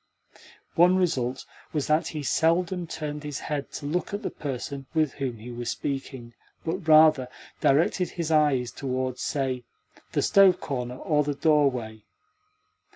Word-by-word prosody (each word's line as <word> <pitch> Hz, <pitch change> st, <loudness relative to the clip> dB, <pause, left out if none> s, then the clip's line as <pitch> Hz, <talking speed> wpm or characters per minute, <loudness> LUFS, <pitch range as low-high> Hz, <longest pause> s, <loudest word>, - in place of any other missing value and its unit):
One 180 Hz, +2 st, +5 dB
result 135 Hz, -9 st, 0 dB, 0.3 s
was 150 Hz, -3 st, 0 dB
that 155 Hz, +1 st, +2 dB
he 150 Hz, -2 st, -5 dB
seldom 170 Hz, +4 st, +1 dB
turned 150 Hz, -2 st, -5 dB
his 145 Hz, -2 st, -5 dB
head 145 Hz, -2 st, -4 dB
to 145 Hz, -, -6 dB
look 175 Hz, +6 st, -2 dB
at 205 Hz, -, -6 dB
the -, -, -3 dB
person 135 Hz, 0 st, -5 dB
with 155 Hz, -4 st, +2 dB
whom 130 Hz, -4 st, -4 dB
he 115 Hz, +3 st, -9 dB
was 120 Hz, 0 st, -4 dB
speaking, 135 Hz, -4 st, -4 dB, 0.3 s
but, 165 Hz, +1 st, -3 dB
rather, 155 Hz, -4 st, +6 dB, 0.3 s
directed 165 Hz, +6 st, +2 dB
his 165 Hz, -3 st, -3 dB
eyes 145 Hz, -6 st, +3 dB
towards, 130 Hz, -1 st, -3 dB
say, 130 Hz, -3 st, -2 dB, 0.5 s
the -, -, +1 dB
stove 195 Hz, -2 st, +5 dB
corner 125 Hz, -3 st, -4 dB
or 150 Hz, 0 st, +1 dB
the 145 Hz, 0 st, -2 dB
doorway. 135 Hz, -8 st, +1 dB
145 Hz, 150 wpm, -26 LUFS, 130-160 Hz, 0.5 s, rather